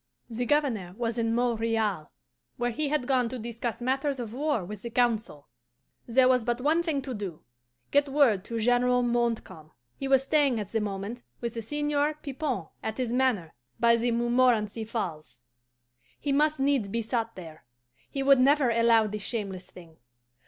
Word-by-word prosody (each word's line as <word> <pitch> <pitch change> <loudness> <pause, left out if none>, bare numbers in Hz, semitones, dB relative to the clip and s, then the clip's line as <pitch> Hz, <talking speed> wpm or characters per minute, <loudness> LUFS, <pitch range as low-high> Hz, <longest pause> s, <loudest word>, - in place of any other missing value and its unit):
The 240 +2 -2
Governor 230 -12 0
was 235 -1 -2
in 230 0 +1
Montreal, 225 -7 0 0.5
where 245 -1 0
he 290 +5 -1
had 300 -4 0
gone 250 -3 +2
to 255 - -5
discuss 235 0 -5
matters 270 +2 0
of 230 -2 -5
war 280 - -1
with 205 +1 -8
the 235 - -5
Council. 230 - 0 0.6
"There 255 +2 +4
was 255 -2 +3
but 240 +1 -1
one 305 +6 +2
thing 310 -5 -1
to 260 -1 -5
do 195 -7 -6 0.5
get 285 0 +3
word 265 -9 +3
to 230 - -4
General 245 +2 +3
Montcalm. 235 -10 -1 0.3
He 275 - -3
was 270 -1 +4
staying 275 -4 +2
at 205 - -6
the 225 - 0
moment 205 +3 -4 0.2
with 235 -1 -4
the 230 - -4
Seigneur 295 +4 0
Pipon 275 - -4
at 220 0 -4
his 250 -2 -2
manor 245 -11 +1 0.3
by 235 0 +5
the 235 +1 0
Montmorenci 235 -2 +2
Falls. 155 - -5 0.8
He 285 - -2
must 300 +1 +2
needs 270 -6 +1
be 230 +3 -2
sought 230 0 -2
there: 165 -4 -11 0.5
he 275 - -2
would 275 -1 +6
never 275 -1 +4
allow 230 -1 +4
this 210 0 -4
shameless 195 -4 -4
thing. 165 -3 -15
235 Hz, 175 wpm, -28 LUFS, 215-265 Hz, 0.8 s, would